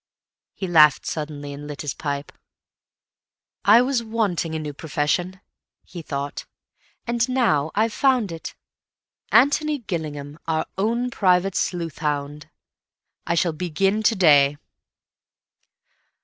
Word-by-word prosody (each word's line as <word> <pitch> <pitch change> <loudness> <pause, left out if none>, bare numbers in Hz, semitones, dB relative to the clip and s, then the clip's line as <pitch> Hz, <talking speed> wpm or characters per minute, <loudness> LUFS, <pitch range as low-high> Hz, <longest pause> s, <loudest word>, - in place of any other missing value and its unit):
He 195 - -4
laughed 155 -4 +5
suddenly, 145 -2 -5
and 145 +1 -9
lit 145 0 -7
his 145 - -3
pipe. 140 -1 -4 1.3
"I 225 +4 +6
was 255 -2 0
wanting 210 -8 -1
a - - 0
new 150 -2 -5
profession," 160 +5 -2 0.4
he 175 - -9
thought, 140 -2 -5 0.6
"and 235 +1 0
now 195 - +2
I've 220 +1 +1
found 255 -8 +2
it. 165 0 -7 0.8
Antony 300 +2 +3
Gillingham, 155 - -6
our 160 -1 0
own 235 +5 -1
private 185 -2 +2
sleuthhound. 150 -5 -3 0.8
I 170 - +1
shall 170 -1 +1
begin 180 +5 0
to 220 +1 +3
day." 145 -6 +5
170 Hz, 115 wpm, -23 LUFS, 150-215 Hz, 1.3 s, I